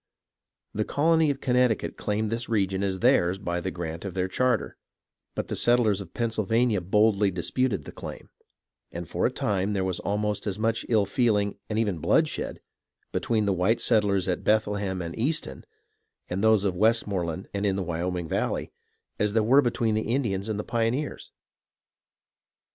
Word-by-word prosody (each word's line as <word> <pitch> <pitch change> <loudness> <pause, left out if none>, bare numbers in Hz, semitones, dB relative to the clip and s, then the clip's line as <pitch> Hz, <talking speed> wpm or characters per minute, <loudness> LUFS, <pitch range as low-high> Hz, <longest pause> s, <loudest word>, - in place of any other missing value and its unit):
The 110 - 0
colony 160 +5 +2
of 140 -1 -2
Connecticut 125 -3 +1
claimed 105 +1 -2
this 115 +1 -2
region 95 -4 0
as 95 -2 -1
theirs 95 -8 +3
by 90 -3 -3
the 95 - -2
grant 85 -2 -5
of 100 -2 -6
their 95 0 0
charter; 125 +6 0 0.6
but - - -3
the - - -3
settlers 115 -5 +3
of 90 -3 -11
Pennsylvania 115 -1 +1
boldly 105 +2 +3
disputed 100 +6 -1
the - - -9
claim, - - -9 0.6
and - - -6
for - - +1
a - - -3
time 100 0 -1
there 95 -2 0
was 95 -1 -2
almost 105 0 -2
as 100 -1 -2
much 110 +1 -1
ill 110 -4 +3
feeling, 105 -2 +1
and 105 - -2
even 105 -7 0
bloodshed, - - 0 0.5
between 110 -2 0
the 100 - +2
white 95 +6 +2
settlers 100 -5 +2
at 90 - -1
Bethlehem 105 -3 0
and 85 0 -6
Easton 120 - -2 0.6
and 95 +3 -3
those 110 -2 +4
of 95 -2 0
Westmore 105 -2 +2
land 90 +4 -5
in 100 -1 0
the 95 - -1
Wyoming 85 0 -3
Valley, - - -2 0.5
as 105 -1 +1
there 110 -1 +3
was 130 +6 +6
between 120 -3 0
the 110 0 -1
Indians 110 -6 -1
and 105 -1 -2
the - - -2
pioneers. 120 +5 -2
105 Hz, 170 wpm, -26 LUFS, 95-115 Hz, 0.6 s, was